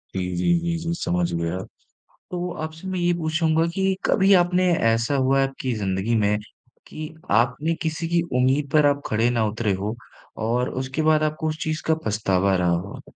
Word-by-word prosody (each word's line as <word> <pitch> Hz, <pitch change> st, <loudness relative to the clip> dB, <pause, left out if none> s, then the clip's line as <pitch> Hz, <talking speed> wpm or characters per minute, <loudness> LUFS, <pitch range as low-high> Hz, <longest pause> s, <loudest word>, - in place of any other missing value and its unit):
जी, -, -, 0 dB, 0.2 s
जी, 90 Hz, -, +2 dB
जी, 170 Hz, 0 st, -2 dB
जी, 165 Hz, 0 st, -3 dB
समझ 90 Hz, -, -1 dB
गया। 85 Hz, +1 st, -2 dB, 0.7 s
तो 180 Hz, 0 st, -3 dB
आपसे 160 Hz, +3 st, -7 dB
मैं 185 Hz, -1 st, -2 dB
ये 175 Hz, 0 st, +2 dB
पूछूँगा 160 Hz, -1 st, +1 dB
कि 190 Hz, 0 st, +1 dB
कभी 195 Hz, -1 st, +4 dB
आपने 180 Hz, +1 st, +2 dB, 0.2 s
ऐसा 115 Hz, +5 st, 0 dB
हुआ 135 Hz, 0 st, +2 dB
है 135 Hz, -, +2 dB
आपकी 130 Hz, -1 st, -4 dB
ज़िंदगी 100 Hz, +2 st, -1 dB
में, 105 Hz, -1 st, +2 dB, 0.5 s
कि 155 Hz, 0 st, -7 dB, 0.2 s
आपने 130 Hz, +9 st, +2 dB
किसी 160 Hz, +1 st, -2 dB
की 170 Hz, 0 st, +2 dB, 0.2 s
उम्मीद 135 Hz, +3 st, +2 dB
पर 150 Hz, -1 st, +5 dB
आप 145 Hz, 0 st, +2 dB
खड़े 110 Hz, +2 st, +2 dB
ना 115 Hz, -2 st, +1 dB
उतरे 105 Hz, -1 st, -1 dB
हों, 100 Hz, +3 st, -3 dB, 0.5 s
और 120 Hz, +3 st, 0 dB
उसके 130 Hz, +4 st, -3 dB
बाद 155 Hz, 0 st, +3 dB
आपको 155 Hz, +1 st, -1 dB
उस 155 Hz, -, -4 dB
चीज़ 155 Hz, 0 st, -2 dB
का 160 Hz, -, +4 dB
पछतावा 100 Hz, -3 st, +1 dB
रहा 90 Hz, -1 st, +1 dB
हो? 90 Hz, +4 st, -3 dB
140 Hz, 185 wpm, -23 LUFS, 110-160 Hz, 0.7 s, पर